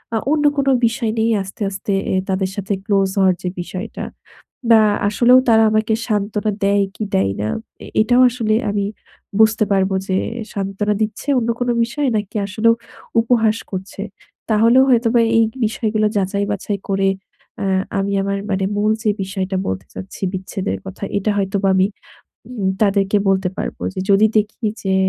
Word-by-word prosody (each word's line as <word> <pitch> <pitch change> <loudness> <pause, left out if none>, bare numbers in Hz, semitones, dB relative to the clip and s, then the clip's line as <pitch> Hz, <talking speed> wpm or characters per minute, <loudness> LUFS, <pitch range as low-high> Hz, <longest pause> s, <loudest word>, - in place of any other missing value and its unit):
আ - - +2
অন্য 305 -1 +2
কোন 275 -1 0 0.2
বিষয় 230 -1 0
নিয়েই 225 +1 +2
আস্তে, 195 +3 -12
আস্তে 195 +1 -3 0.2
এ - - +2
তাদের 190 0 0
সাথে 200 0 -2
close 195 -2 +2
হওয়ার 190 -2 +4
যে 180 - -1
বিষয়টা। 185 +5 -6 0.7
না 225 - +7 0.3
আসলেও 245 +4 +5
তারা 225 -1 +6
আমাকে 215 +1 +1
সান্ত্বনা 210 0 -1
দেয় 200 0 +3
কি 215 - -3
দেয় 95 +1 +2
না? 105 - -1 0.4
এ - - -9 0.2
এটাও 245 +3 +4
আসলে 225 -3 0 0.2
আমি 205 -1 -1 0.6
বুঝতে 220 0 +4
পারবো 190 0 +2
যে 185 - +1 0.4
সান্ত্বনা 200 +1 -1
দিচ্ছে 215 +6 -4
অন্য 235 -1 -1
কোন 245 - 0 0.2
বিষয়ে 285 +4 -2
নাকি 210 0 -4
আসলেও 220 +4 +2 0.5
উপহাস 225 -2 +2
করছে? 190 +1 -6 0.5
তাহলেও 230 +4 +5
হয়তোবা 235 -1 +3 0.2
এই 225 - +5 0.2
বিষয়গুলা 215 -1 0
যাচাই 200 +1 0
বাছাই 205 0 -3
করে 195 0 +1 0.5
এ - - -1 0.3
আমি 195 +1 -1
আমার 200 0 -1
মানে 190 -1 0
মূল 210 +1 +2
যে 215 - +2
বিষয়টা 190 0 -3
বলতে 95 0 -3
চাচ্ছি 190 +1 -9
বিচ্ছেদের 185 - -3
কথা, 95 - -7
এটা 200 +2 -1
হয়তোবা 195 0 0
আমি 190 0 +4 0.6
উম 210 -6 -2
তাদেরকে 200 0 +2
বলতে 190 -1 +2
পারব। - - -3 0.2
যে 190 - -3
যদি 200 +2 +6
দেখি 215 +2 -2 0.2
যে 190 -1 0
205 Hz, 165 wpm, -19 LUFS, 195-225 Hz, 0.7 s, না